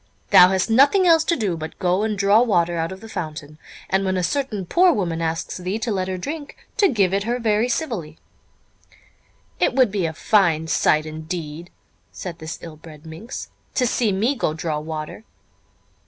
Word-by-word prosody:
Thou 180 0 +9
hast 190 -1 +1
nothing 280 - +4
else 325 -2 +5
to 340 - +2
do 205 - -1
but 160 -1 -7
go 185 +1 +1
and 215 -1 -1
draw 200 +3 +4
water 175 -7 +2
out 165 +1 -2
of 190 +1 -9
the 225 - -10
fountain, 155 -6 -7 0.3
and 190 +1 +1
when 190 -1 0
a 180 - -1
certain 215 0 -2
poor 355 - +4
woman 170 - -2
asks 165 0 -3
thee 185 +3 -3
to 225 +1 -3
let 185 -2 -1
her 185 -1 -3
drink, 290 - -6 0.2
to 410 -2 +5
give 200 - +1
it 200 +1 0
her 240 +2 0
very 225 0 +1
civilly." 220 - -3 1.4
"It - - +2
would 255 -6 +4
be 190 -4 0
a 160 - -5
very - - -17
fine 170 -7 +3
sight 155 0 +2
indeed," 160 +1 -6 0.4
said 170 -2 -7
this 160 +1 -6
ill 160 -2 -9
bred 155 -1 -14
minx, 165 +11 -8 0.2
"to 255 - +2
see 235 -2 +1
me 215 +8 +1
go 185 - -2
draw 160 -2 -2
water!" 155 +5 -6
190 Hz, 195 wpm, -22 LUFS, 165-225 Hz, 1.4 s, Thou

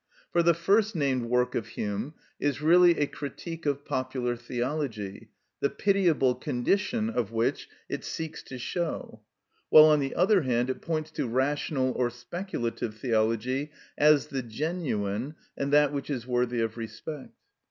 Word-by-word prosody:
For 170 - +3
the 170 0 +4
first 200 +5 +2
named 135 -6 0
work 125 0 +2
of 110 - -2
Hume 105 +9 -4 0.2
is 145 -1 0
really 170 +2 +6
a 145 - +3
critique 155 +4 -6
of 140 0 -1
popular 130 -3 -2
theology, 120 -4 -4 0.3
the 140 - +1
pitiable 175 -10 +2
condition 195 - 0
of 120 - -2
which 115 0 -1 0.2
it - - -4
seeks 160 -1 -5
to 130 - -7
show; 160 +7 -4 0.5
while, 155 - +10
on 155 -1 +5
the 135 -1 -2
other 190 +2 +4
hand, 125 -2 +1
it - - -7
points 155 -1 -2
to 130 - -2
rational 130 +1 0
or 125 -1 0
speculative 120 - -4
theology 115 +4 0 0.3
as 150 -1 +5
the 135 -1 -2
genuine, 125 - -3 0.2
and 140 0 -2
that 145 0 +5
which 140 0 -4
is 125 -5 -3
worthy 125 -1 0
of 115 0 -2
respect. 115 +6 -7
135 Hz, 155 wpm, -28 LUFS, 120-155 Hz, 0.5 s, while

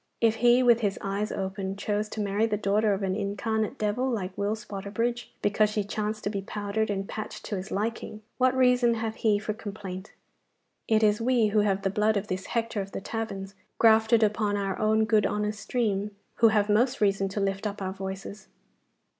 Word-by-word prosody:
If 225 -1 +3
he 240 +2 +5
with 240 -2 +5
his 205 -4 -1
eyes 200 +2 -2
open 190 0 -3
chose 210 +1 -2
to 215 - -4
marry 205 +2 +1
the 210 -2 -1
daughter 210 +1 +2
of 195 - -5
an 190 -1 0
incarnate 215 +2 -2
devil 215 +5 0
like 190 -6 -3
Will 205 +2 0
Spotterbridge, 215 +3 -3 0.2
because 210 +1 +3
she 210 -1 -1
chanced 215 +1 -3
to 205 - -1
be 200 -2 -3
powdered 210 +2 -2
and 195 -1 -2
patched 215 - -6
to 210 - -3
his 190 +2 -5
liking, 215 0 -3 0.2
what 255 0 +3
reason 250 -2 +4
hath 220 -1 -2
he 215 -2 +2
for 210 +1 -3
complaint? 200 -3 -7 0.8
It 220 0 +3
is 210 +1 +3
we, 235 -2 +3
who 210 +1 +2
have 200 -1 +1
the 195 - +1
blood 210 +1 +2
of 200 +1 -3
this 185 0 -3
Hector 230 -3 -1
of 195 0 -8
the - - -3
taverns 195 -2 -5 0.2
grafted 220 0 +5
upon 210 -1 +1
our 195 -1 -1
own 220 0 +3
good 215 -2 +3
honest 210 0 -2
stream, 210 -5 -1 0.3
who 230 - +6
have 210 -2 +3
most 240 +6 +2
reason 195 -1 +2
to 195 - -3
lift 195 +1 -1
up 205 0 -6
our 190 -1 -3
voices. 195 +1 -7
210 Hz, 200 wpm, -27 LUFS, 200-220 Hz, 0.8 s, who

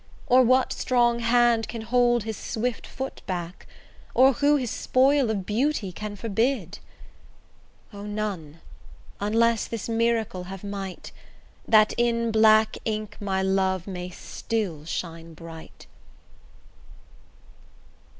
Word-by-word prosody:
Or 255 +1 +5
what 255 +1 +3
strong 240 -2 +2
hand 235 -1 +3
can 230 -2 -6
hold 240 0 +2
his 220 0 -4
swift 235 +3 -3
foot 265 0 -6
back? 175 -1 -5 0.5
Or 265 +2 +6
who 290 +3 +3
his 255 -5 -1
spoil 270 0 +2
of 200 -4 -2
beauty 225 -1 0
can 210 +3 -6
forbid? 220 -2 -1 1.1
O! 200 - -8
none, 195 -7 -5 0.6
unless 225 +2 +2
this 230 -4 -5
miracle 225 -5 0
have 190 +1 -8
might, 195 -2 -6 0.6
That 215 -1 +5
in 235 -1 +1
black 220 0 +4
ink 215 -1 -3
my 190 -2 -1
love 190 -1 0
may 180 -2 -6
still 180 -4 -4
shine 165 -1 -6
bright. 165 0 -12
220 Hz, 115 wpm, -25 LUFS, 190-240 Hz, 1.1 s, Or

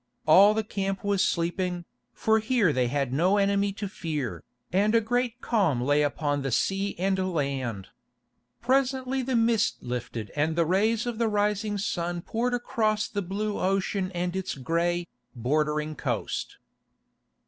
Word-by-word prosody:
All 195 +7 +7
the 220 - 0
camp 195 -2 -3
was 200 -2 +2
sleeping, 175 +1 -1 0.3
for 220 - +2
here 220 - +2
they 125 -2 +1
had 135 0 -1
no 180 +8 +3
enemy 200 0 +2
to 205 0 -4
fear, 155 -8 -4 0.3
and 210 +4 +3
a - - +7
great 245 +2 -1
calm 190 - +1
lay 145 +4 +2
upon 145 0 0
the 135 - -2
sea 195 - 0
and 190 +2 0
land. 130 - -2 0.7
Presently 265 +1 +1
the 255 0 -1
mist 225 -1 +2
lifted 120 -3 -5
and 155 +2 +1
the 170 -1 +2
rays 215 +7 +2
of 240 -2 -4
the 230 - +2
rising 210 0 0
sun 175 -5 -2
poured 245 +2 -1
across 215 -3 0
the 205 - -3
blue 205 +3 -3
ocean 195 0 0
and 175 +1 -2
its 190 -1 -3
gray, 170 +5 0 0.3
bordering 150 +5 0
coast. 120 -8 -3
190 Hz, 150 wpm, -27 LUFS, 150-215 Hz, 0.7 s, All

